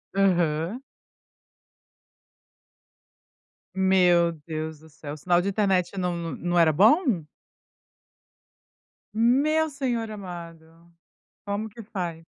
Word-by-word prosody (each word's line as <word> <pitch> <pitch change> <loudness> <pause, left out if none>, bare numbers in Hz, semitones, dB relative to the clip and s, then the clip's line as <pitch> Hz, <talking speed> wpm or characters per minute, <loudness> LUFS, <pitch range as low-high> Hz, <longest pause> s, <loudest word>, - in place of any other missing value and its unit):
Aham. 175 +2 +1 2.9
Meu 180 -3 +4 0.2
Deus 155 -1 -5
do 160 +1 -17
céu, 150 -1 -8
sinal 175 +3 +2
de 200 - -1
internet 195 -2 0
não 180 -2 -1
no 165 -4 -4
não 175 0 0
era 165 -2 +5
bom? 220 - +4 1.9
Meu 285 +8 +2
senhor 245 -5 -2
amado. 170 -4 -10 0.5
Como 205 +2 -3
que 230 +3 -11
faz? 175 -6 -5
180 Hz, 90 wpm, -25 LUFS, 165-215 Hz, 2.9 s, era